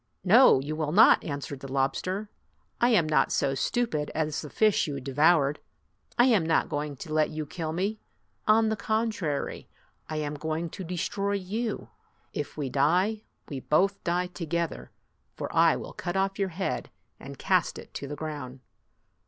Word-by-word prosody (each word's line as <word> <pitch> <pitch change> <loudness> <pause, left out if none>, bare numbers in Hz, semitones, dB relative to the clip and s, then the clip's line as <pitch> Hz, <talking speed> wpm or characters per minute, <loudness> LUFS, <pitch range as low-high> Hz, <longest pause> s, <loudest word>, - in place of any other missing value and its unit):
"No, 215 - +7
you 145 +3 -4
will 155 -1 -2
not," 200 +7 +6
answered 140 -1 -5
the 135 0 -9
lobster. 185 +10 -1 0.3
" - - -41
I 240 - +5
am 205 -10 +4
not 155 - +2
so 140 -1 +1
stupid 155 - -1
as 155 -2 -1
the 150 - -8
fish 215 +2 +3
that - - -3
you 140 - -4
devoured. 145 +2 +3 0.6
I 240 - +6
am 225 -9 +4
not 160 0 +1
going 145 0 -3
to 155 +3 -7
let 155 -1 +3
you 155 -1 -4
kill 160 +1 -4
me. 195 +6 -2 0.5
On 220 +1 +5
the 220 - 0
contrary, 215 -8 -2 0.4
I 155 - -3
am 150 -1 -2
going 160 +2 -3
to 190 - -7
destroy 185 +3 -2
you. 210 +4 -3 0.4
If - - -5
we 145 -3 -2
die, 180 - +1 0.2
we 140 - -5
both 195 +9 +1
die 175 +1 0
together; 170 -2 -3 0.5
for - - -5
I - - +5
will - - -7
cut 175 +2 -3
off 195 +1 0
your 195 -1 +1
head 185 +2 -3 0.3
and - - -9
cast - - +1
it - - -11
to 140 - -5
the 145 - -5
ground!" 145 -4 -6
160 Hz, 175 wpm, -27 LUFS, 150-195 Hz, 0.6 s, No